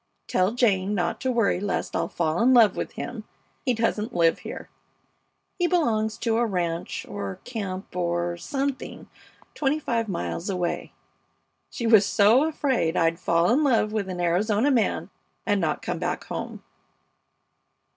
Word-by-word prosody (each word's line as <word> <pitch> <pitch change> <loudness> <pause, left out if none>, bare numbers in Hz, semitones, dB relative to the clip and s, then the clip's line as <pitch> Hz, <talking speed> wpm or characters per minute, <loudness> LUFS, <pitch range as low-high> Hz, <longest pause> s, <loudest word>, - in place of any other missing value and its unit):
Tell 185 +4 +1
Jane 210 -5 +2
not 175 -3 -1
to 260 - 0
worry 230 -6 +2
lest 190 -2 -2
I'll - - 0
fall 160 +2 -1
in 255 +2 +5
love 220 -5 +6
with - - -4
him; 235 -3 -6 0.4
he 250 - +3
doesn't 225 -1 -1
live 165 -1 +3
here. - - -8 0.9
He 355 - +3
belongs 225 -11 +1
to 230 -2 0
a 240 - +2
ranch 175 -4 -3
or 100 -2 -5
camp 195 -6 -6
or 175 -1 -1
something 275 - -4 0.5
twenty 290 0 0
five 230 -6 -1
miles 165 - -3
away. 180 -2 -2 0.8
She 235 - -5
was 220 -3 +7
so 220 +8 +4
afraid 260 - 0
I'd 165 -1 +2
fall 170 +2 +2
in 285 +6 +3
love 230 -6 +2
with 210 -3 -2
an 180 -1 -5
Arizona 205 +9 +2
man 240 -5 0 0.3
and 205 -1 +1
not 155 -3 -1
come - - -3
back - - -2
home. - - -6
210 Hz, 155 wpm, -25 LUFS, 175-240 Hz, 0.9 s, was